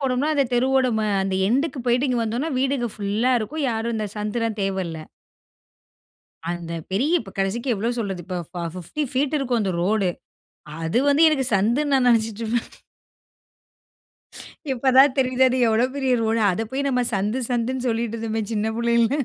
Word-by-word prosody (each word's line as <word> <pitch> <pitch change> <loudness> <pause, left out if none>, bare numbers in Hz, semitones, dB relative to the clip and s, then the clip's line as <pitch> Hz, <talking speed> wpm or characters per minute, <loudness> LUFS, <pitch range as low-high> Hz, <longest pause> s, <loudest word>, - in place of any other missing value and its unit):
போனோம்னா, 270 +2 0
அந்த 280 -2 +3
தெருவோட 260 +1 +3 0.4
அந்த 190 0 -2
எண்டுக்கு 275 +4 0
போய்ட்டு 245 +3 +2
இங்கே 245 -2 0
வந்தோம்னா 240 +8 -2
வீடுங்க 265 -3 0
ஃபுல்லா 210 +5 0
இருக்கும். 280 +8 -3
யாரும் 225 +1 -2
இந்த 215 -1 -2
சந்துல 215 +2 -2 0.2
தேவல்ல. 190 -4 -2 1.5
அந்த 170 -1 -5 0.2
பெரிய 285 - +2
இப்ப 195 -4 -11
கடைசிக்கு 230 +7 0
எவ்வளோ 225 +4 -1
சொல்றது, 195 -5 -3
இப்போ 180 -1 -4
ஃபா 175 -2 -5
50 185 - -4
பீட் 285 +3 +1
இருக்கும் 245 -4 0
அந்த 190 - -1
ரோடு. 200 -1 +1 0.7
அது 165 +9 +1
வந்து 290 +3 +4
எனக்கு 270 -4 0
சந்துன்னு 240 +9 +2
நான் 250 -2 +3
நெனைச்சுட்டுருப்பேன். 225 0 0 2.0
இப்ப 260 +1 +1
தான் 270 0 +7
தெரியுது 255 0 +3
அது 255 - -1
எவ்வளோ 225 +3 +3
பெரிய 265 -2 +1
ரோடு, 225 0 +1
அத 220 +5 -2
போய் 280 +1 -1
நம்ம 250 -2 +1
சந்து 210 +6 -1
சந்துன் 250 +1 -1
சொல்லிட்டு 230 0 -1
இருந்தோமே 225 0 -2
சின்ன 215 +1 0
புள்ளைல. 235 0 +2
235 Hz, 155 wpm, -23 LUFS, 210-260 Hz, 2.0 s, தான்